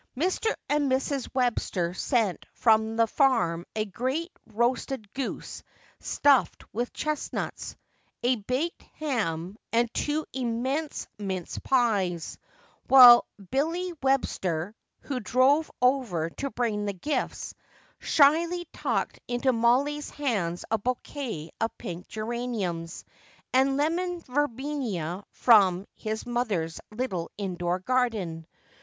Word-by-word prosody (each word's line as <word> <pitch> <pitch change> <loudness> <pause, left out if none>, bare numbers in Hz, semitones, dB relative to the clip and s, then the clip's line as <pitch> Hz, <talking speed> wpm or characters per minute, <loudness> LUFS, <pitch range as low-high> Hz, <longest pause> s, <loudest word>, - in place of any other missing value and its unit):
Mr. 370 +8 +1 0.2
and 290 -2 +1
Mrs. 265 0 0
Webster 215 -8 0
sent 220 -1 0
from 220 -1 +3
the 230 0 +4
farm 225 - +2
a 215 -1 0
great 260 - -2 0.2
roasted 235 -1 -1
goose 265 -1 -5 0.4
stuffed 280 -3 +2
with 240 +3 -2
chestnuts, 305 -1 -3 0.5
a 250 +1 +3
baked 255 +11 -2 0.2
ham 200 - -2 0.2
and 235 0 +1
two 300 +1 -1
immense 260 +5 -2
mince 190 -4 -4
pies, 200 -10 0 0.5
while 250 -3 +10 0.2
Billy 335 +6 0
Webster, 205 -9 0 0.3
who 270 -3 -3
drove 260 +7 +3
over 230 -12 +2
to 275 - -4
bring 220 -5 -1
the 200 - -1
gifts, 285 - -3 0.5
shyly 335 +4 +3
tucked - - -2
into 245 +2 +1
Mollie's 265 +6 +2
hands 200 -12 -2
a 225 - +2
bouquet 240 - -4
of 225 - -1
pink 175 0 -7
geraniums 215 -7 -4 0.5
and 270 +1 +3
lemon 345 +4 0
verbena 250 - -2
from 195 -5 +4
his 220 0 -4
mother's 210 -10 -2
little 215 -7 -3
indoor 180 -3 -1
garden. 195 -7 -1
240 Hz, 110 wpm, -27 LUFS, 195-275 Hz, 0.5 s, while